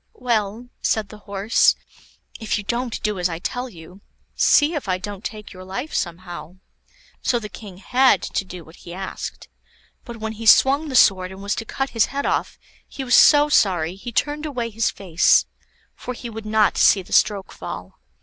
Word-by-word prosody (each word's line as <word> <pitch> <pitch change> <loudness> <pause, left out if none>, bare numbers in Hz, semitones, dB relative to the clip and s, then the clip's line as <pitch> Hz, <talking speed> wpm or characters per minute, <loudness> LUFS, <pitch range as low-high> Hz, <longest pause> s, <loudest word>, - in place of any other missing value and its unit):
"Well," 230 - -2
said 215 -3 0
the 215 - -12
Horse, 200 +3 +3 0.6
"if 220 -1 -1
you 210 - -5
don't 235 +2 -3
do 210 -3 -1
as 180 0 +1
I 165 - -4
tell 245 +8 -4
you, 180 0 -14 0.3
see 295 +3 +4
if 290 - -4
I 185 - +1
don't 200 +2 -8
take 215 -3 -7
your 185 0 -11
life 250 +11 -6
somehow." 175 -2 -5 0.7
So 245 - +1
the 215 -3 -6
King 195 -3 -11
had 255 +6 +3
to - - -2
do 180 -2 -10
what 160 - -16
he 175 - -10
asked; 190 0 -7 0.6
but 235 -2 -9
when 220 0 -4
he 220 +1 -6
swung 280 +7 +5
the 265 - -4
sword 185 -5 +4
and 190 +1 -10
was 205 +1 -1
to 225 - -5
cut 270 +4 -3
his 230 -2 +3
head 280 +1 -4
off, - - -1 0.3
he 270 - -7
was 250 -1 -1
so 295 0 +7
sorry 180 - +2
he 195 +6 -8
turned 295 +5 -1
away 240 -5 -4
his 225 +1 0
face, 185 -3 +3 0.5
for 250 - -7
he 235 0 -8
would 220 -1 -8
not 215 -1 +2
see 195 - +5
the - - -10
stroke 205 -3 +2
fall. - - -8
215 Hz, 195 wpm, -22 LUFS, 190-245 Hz, 0.7 s, so